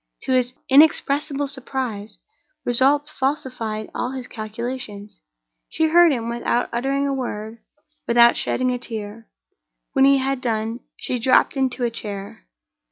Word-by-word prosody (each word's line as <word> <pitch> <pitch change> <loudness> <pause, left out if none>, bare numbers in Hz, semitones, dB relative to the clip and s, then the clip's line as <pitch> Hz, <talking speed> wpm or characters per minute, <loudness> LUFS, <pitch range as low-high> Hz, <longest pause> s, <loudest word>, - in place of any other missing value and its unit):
To - - -2
his 255 -1 +2
inexpressible 285 0 +3
surprise, 250 -6 -4 0.5
results 280 +5 +3
falsified 255 -7 -3
all 250 - -3
his 260 -2 -5
calculations. 215 -1 -7 0.5
She 320 0 +1
heard 345 0 +6
him 235 -4 -2
without 240 +1 -1
uttering 275 +4 0
a 275 - 0
word, 225 -3 -5 0.5
without 235 0 +6
shedding 255 0 0
a 250 - -2
tear. 220 -1 -7 0.7
When 270 - +5
he 275 0 +6
had 270 0 -1
done, 225 -1 -2 0.2
she 250 - -2
dropped 255 +5 +3
into 260 -2 0
a 235 - +1
chair. 200 - -7
250 Hz, 135 wpm, -22 LUFS, 225-270 Hz, 0.7 s, heard